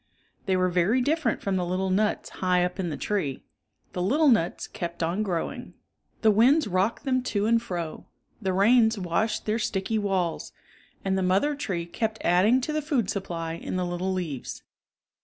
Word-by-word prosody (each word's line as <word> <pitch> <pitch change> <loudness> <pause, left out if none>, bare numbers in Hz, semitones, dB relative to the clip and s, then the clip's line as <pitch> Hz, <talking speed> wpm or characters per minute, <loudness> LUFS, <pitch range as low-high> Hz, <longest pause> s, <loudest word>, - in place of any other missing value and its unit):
They 190 -1 +2
were 185 0 +2
very 180 +8 +2
different 305 +5 0
from 195 -1 0
the 180 - 0
little 185 +2 -1
nuts 210 +3 0
high 180 -1 +1
up 180 +2 -5
in 180 -3 -1
the 150 - -4
tree 170 -11 -2 0.5
The 180 - -2
little 285 - +3
nuts 185 -8 +1
kept 170 0 -5
on 170 +6 0
growing. 180 -6 -3 0.5
The 220 - +6
winds 245 +7 +4
rocked 190 +4 0
them 255 -1 +1
to 210 -5 -1
and 230 +1 +3
fro, 175 -8 -5 0.3
the 190 -2 0
rains 220 +4 +4
washed 200 +4 -1
their 220 +2 0
sticky 210 +1 -1
walls, 190 -5 -1 0.5
and 190 0 +1
the - - 0
mother 190 +11 +2
tree 185 -12 -3
kept 220 +5 -3
adding 205 +9 +4
to 305 +4 -3
the 305 - 0
food 275 - 0
supply 170 -4 -4
in 170 - -5
the 180 -1 0
little 175 +2 -2
leaves. 170 -8 -4
190 Hz, 180 wpm, -26 LUFS, 180-225 Hz, 0.5 s, The